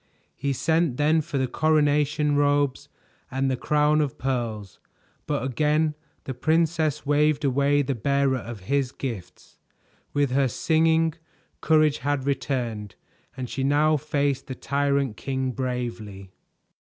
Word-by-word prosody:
He 140 0 -2
sent 160 +1 +1
then 155 +2 +3
for 145 -1 -4
the 130 - +1
coronation 150 +1 +2
robes 145 -1 +1 0.4
and 135 +1 0
the - - +1
crown 150 +3 +2
of 145 -4 -2
pearls, 115 -7 -3 0.5
but - - -1
again 150 +4 +1 0.3
the 130 - -5
princess 155 +2 +1
waved 150 +1 +2
away 140 +2 +2
the 135 0 -1
bearer 140 +2 +1
of 115 -4 -8
his 135 +5 0
gifts. 115 -11 -8 0.5
With 145 -2 +1
her 135 +1 +3
singing, 160 +4 +2 0.5
courage 155 -2 +3
had 140 +1 -1
returned, 120 -7 -2 0.4
and 130 -1 -4
she 135 +2 -3
now 150 +3 +3
faced 145 -2 -1
the 130 - -5
tyrant 140 -5 0
king 130 -1 -2
bravely. 120 -6 -5
140 Hz, 130 wpm, -25 LUFS, 130-150 Hz, 0.5 s, then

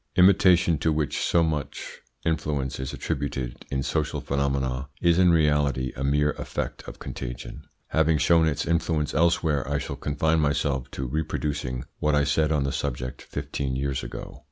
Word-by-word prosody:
Imitation, 90 -3 +5
to 80 - +2
which 75 -2 -1
so 85 - +3
much 75 -4 -3 0.3
influence 75 -5 -1
is 65 0 -3
attributed 65 -3 -3
in 65 -1 -1
social 75 +2 -1
phenomena, 70 -1 -1
is 85 0 +3
in 90 -1 +6
reality 75 -5 +2
a 65 - -4
mere 75 +2 +2
effect - - -4
of - - -8
contagion. - - -7 0.3
Having 80 0 +3
shown 80 +1 +4
its 75 -2 -1
influence 80 -3 0
elsewhere, 80 -4 +2
I 70 - +2
shall - - -4
confine 80 +2 +1
myself 70 -3 0
to 65 - -3
reproducing 70 -3 -2 0.2
what 75 0 +2
I 75 - +3
said 75 +2 +2
on 75 -3 +2
the 70 - -1
subject 65 +1 -3
fifteen 65 -2 -4
years 70 0 -1
ago. - - -7
75 Hz, 160 wpm, -26 LUFS, 70-80 Hz, 0.3 s, in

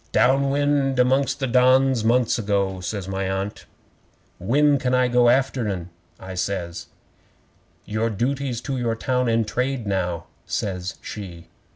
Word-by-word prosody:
'"Down 135 +2 +3
wind 140 -1 +1
amongst 130 +3 +2
the 135 - 0
Dons 130 0 +4
months 120 +1 +2
ago," 100 -3 0
says 95 +1 -4
my 95 0 -2
Aunt. 95 +2 -4 0.7
'"When 140 +8 +3
can 130 -1 +1
I 125 0 +3
go 120 -1 +4
after 130 -2 +1
'en?" 90 -3 -4 0.3
I 95 0 -8
says. 90 -2 -3 1.0
'"Your 110 +2 -1
duty's 125 +3 -2
to 135 -1 -3
your 115 -2 0
town 125 +1 0
and 115 -1 +1
trade 125 +1 -2
now," 90 -4 -2 0.2
says 90 -2 -3
she. 90 -5 -8
115 Hz, 145 wpm, -23 LUFS, 95-130 Hz, 1.0 s, Dons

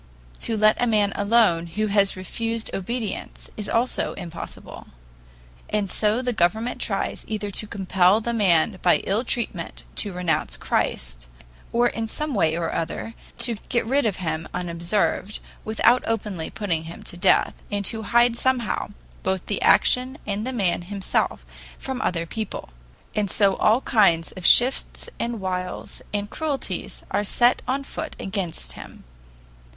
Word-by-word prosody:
To 225 - +2
let 215 +2 +4
a 245 - +3
man 210 -3 +2
alone 200 -5 +3
who 210 +6 -1
has 200 -1 +2
refused 225 +4 -3
obedience 215 +1 -4
is 210 -1 -4
also 240 +2 +1
impossible. 170 -3 -8 0.8
And 205 -3 0
so 215 +4 +2
the 245 -1 0
government 220 +5 +1
tries - - -2
either 210 -2 -3
to 215 - -1
compel 190 0 +3
the 235 +1 -2
man 190 -2 +3
by 175 - +3
ill 210 +5 +1
treatment 220 -9 -2
to 205 - 0
renounce 175 -4 -1
Christ, - - -2 0.4
or 240 +1 +3
in 225 -1 -3
some 300 +6 -2
way 160 -7 +2
or 170 -1 -2
other 195 +7 -3 0.3
to 235 -3 -1
get 235 -2 +1
rid 270 +2 +2
of 205 - 0
him 160 -3 -3
unobserved, 180 +4 0 0.3
without 225 +3 +3
openly 205 -7 -2
putting 170 -6 -2
him 165 - -9
to - - -7
death, 185 +2 +2
and 205 -1 -1
to 220 +2 +2
hide 235 +2 +3
somehow 245 -2 0 0.3
both 190 -1 -1
the 205 - -2
action 255 +2 +4
and 210 +3 -2
the - - -1
man 195 -9 0
himself 190 - -1 0.3
from 265 -1 -4
other 170 -7 0
people. 215 - -5 0.4
And 210 -2 0
so 195 -1 +3
all 225 +4 +4
kinds 185 -11 +3
of 185 -2 -1
shifts 250 +2 +4
and 235 -1 -2
wiles 185 -1 -4
and 205 0 -2
cruelties 290 +4 -3
are 205 - +1
set 240 +4 +3
on 270 +2 0
foot 315 +3 -6
against 195 -6 -2
him. - - -11
210 Hz, 155 wpm, -24 LUFS, 180-230 Hz, 0.8 s, let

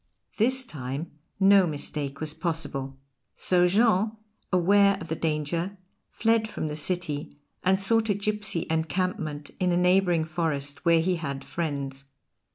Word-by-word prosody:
This 260 +4 +2
time 140 - -5 0.3
no 195 -1 +6
mistake 145 -2 -4
was 155 -1 0
possible. 140 -6 -2 0.4
So 180 -1 +3
Jean, 215 +1 +3 0.4
aware 200 +2 +4
of 165 -3 -9
the 160 - -1
danger, 165 +5 -2 0.3
fled 225 0 +1
from 155 - -4
the 150 - -4
city 150 -3 -2 0.3
and 190 +1 +3
sought 225 +3 +2
a 205 - +3
gipsy 205 -3 -1
encampment 160 -2 -2
in 180 -1 +2
a 175 - +2
neighbouring 180 -2 +3
forest, 150 -3 -2
where 165 -1 +5
he 180 +1 0
had 140 -4 -5
friends. 140 -4 -4
170 Hz, 140 wpm, -27 LUFS, 150-195 Hz, 0.4 s, no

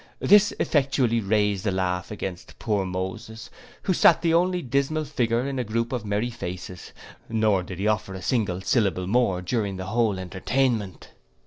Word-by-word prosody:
This 205 +1 +5
effectually 135 -5 +1
raised 105 -1 +1
the 110 - +1
laugh 90 -1 -1
against 95 -4 -7
poor 105 -4 -1
Moses, 95 +5 -6 0.3
who 185 - +1
sate - - +5
the 165 -1 +2
only 180 +1 +2
dismal 140 +4 0
figure 120 -4 0
in 135 -2 -3
a - - 0
groupe 115 +1 -2
of 120 -4 -3
merry 105 +4 -1
faces: 90 -5 -7 0.4
nor, 110 -4 +2
did 90 0 -8
he 100 - -3
offer 105 -3 -1
a 95 - -7
single 100 -6 0
syllable 95 -4 +1
more 95 -3 +1
during 100 0 -2
the 95 - -5
whole 110 -1 +1
entertainment. 100 - -2
110 Hz, 170 wpm, -25 LUFS, 95-125 Hz, 0.4 s, This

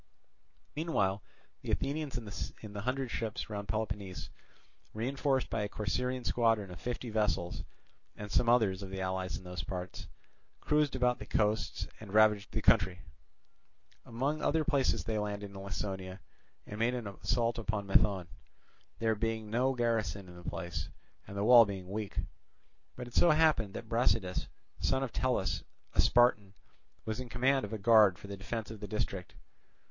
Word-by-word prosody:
Meanwhile 105 - 0 0.4
the - - -7
Athenians 140 -1 -1
in 105 -1 -7
the 100 - -4
hundred 130 +2 -2
ships 115 0 -3
round 100 -1 -4
Peloponnese, 100 -2 -3 0.6
reinforced 135 +3 0
by 110 - 0
a 105 - -2
Corcyraean 125 +6 -1
squadron 115 -5 +2
of 90 - -9
fifty 120 -1 -4
vessels 90 -6 0 0.5
and 105 -1 -7
some 120 - +3
others 105 -6 +3
of 95 - -6
the 95 0 -5
allies 95 -1 -2
in - - -11
those 90 -3 -5
parts, 90 +2 -6 0.5
cruised 150 -2 +2
about 125 -1 +2
the 105 - -8
coasts 105 0 0
and 105 -2 -8
ravaged 105 -2 +5
the - - -2
country. 90 0 +3 1.0
Among 135 +6 -2
other 160 +1 +2
places 140 -4 +1
they 110 -1 -1
landed 105 -1 -3
in 100 - -9
Laconia 95 -1 -4 0.5
and 105 - -7
made 120 +2 +2
an 120 -2 -4
assault 115 +3 0
upon 110 -2 -2
Methone; 95 -2 +3 0.7
there 110 -1 +2
being 110 0 -2
no 130 +3 +2
garrison 110 -6 0
in 90 - -12
the 90 0 -6
place, 85 -3 -4 0.4
and 100 - -7
the 100 - 0
wall 120 +1 +9
being 95 -4 -5
weak. 105 -1 -4 0.8
But 125 - -6
it 120 - -12
so 175 - +5
happened 155 -10 +3
that 115 - -6
Brasidas, 115 -5 +1 0.3
son 135 0 +1
of 130 - -4
Tellis, 120 -9 0 0.3
a - - +5
Spartan, 105 -5 +4 0.5
was 110 +2 -3
in 130 -1 -6
command 130 +2 +2
of 105 - -9
a 110 - -2
guard 105 -3 +6
for - - -12
the 100 0 -6
defence 110 +3 -5
of 110 - -8
the 105 - -6
district. 95 -3 -3
110 Hz, 165 wpm, -32 LUFS, 100-120 Hz, 1.0 s, wall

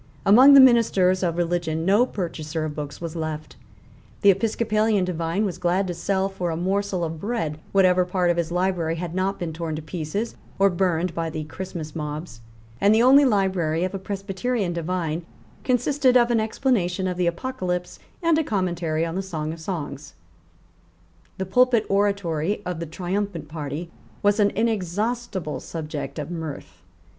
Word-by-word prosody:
Among 255 +8 +8
the - - +10
ministers 220 -8 +5
of 170 -2 0
religion 170 -2 -1
no 205 +7 +4
purchaser 160 -5 -4
of 155 - -4
books 145 -2 -6
was 170 -1 -6
left. 155 -1 -5 0.7
The 200 - +8
Episcopalian 215 0 +1
divine 170 +3 -1
was 180 -3 -4
glad 180 +2 +1
to 180 - -3
sell 190 +3 0
for 185 -3 -3
a 160 - -2
morsel 190 +1 -1
of 160 -1 -4
bread 165 -8 -2
whatever 185 -2 +4
part 180 -1 +1
of 170 - -2
his 170 -1 -1
library 175 -2 0
had 170 0 -5
not 190 +2 -1
been 170 -2 -4
torn 160 -1 -4
to 155 - -5
pieces 170 +7 -3 0.2
or 195 0 +4
burned 175 -1 0
by 165 0 -2
the 155 -1 -4
Christmas 160 -1 -7
mobs; 150 -5 -5 0.4
and 205 +2 +5
the 225 - +4
only 275 +3 +7
library 185 -8 +1
of 185 - -2
a 195 - -3
Presbyterian 195 +1 -2
divine 170 -1 -2 0.4
consisted 255 +1 +3
of 240 0 +3
an 230 - +3
explanation 220 -5 0
of 180 - -2
the 180 -1 0
Apocalypse 180 -2 -3 0.2
and 330 -1 +4
a - - +1
commentary 175 - -1
on 165 - -4
the 190 - -1
Song 160 -5 -4
of 165 - -10
Songs, 150 -4 -6 1.2
The 190 - -2
pulpit 240 +2 +3
oratory 200 -2 0
of 180 -2 -3
the 170 - -4
triumphant 180 -1 -3
party 155 +2 -5 0.3
was 205 +1 +3
an 205 -1 +5
inexhaustible 210 -3 -1
subject 150 -4 -6
of 150 +2 -5
mirth. 160 - -7
180 Hz, 170 wpm, -24 LUFS, 165-200 Hz, 1.2 s, the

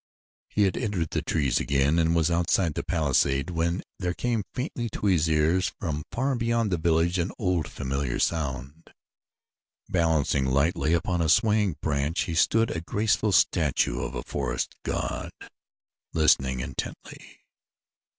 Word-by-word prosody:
He 105 - +1
had 95 -3 +1
entered 100 -9 -2
the - - -1
trees 70 -5 0
again 70 +3 +2
and 85 0 +2
was 85 0 +2
outside 85 0 +1
the - - -2
palisade 70 0 +1
when 85 +2 -1 0.2
there 90 -2 -2
came 120 -3 -1
faintly 125 -3 -3
to 105 - -5
his 85 -5 +3
ears 80 +4 +2
from 75 0 -3
far 135 +3 0
beyond 115 -3 0
the 90 - 0
village 85 +2 +2
an 85 +3 -1
old, 90 -7 0
familiar 70 -3 -3
sound. 70 -1 -3 0.9
Balancing 80 -5 +1
lightly 75 +4 +1
upon 85 +1 0
a 80 - +1
swaying 105 -2 +3
branch 75 +2 0
he 85 - -2
stood, 115 +7 +2
a 80 - -3
graceful 105 +4 0
statue 75 -9 +2
of - - -4
a - - -4
forest - - -3
god, - - -3 0.8
listening 65 -5 +3
intently. 60 - -7
85 Hz, 145 wpm, -26 LUFS, 75-95 Hz, 0.9 s, his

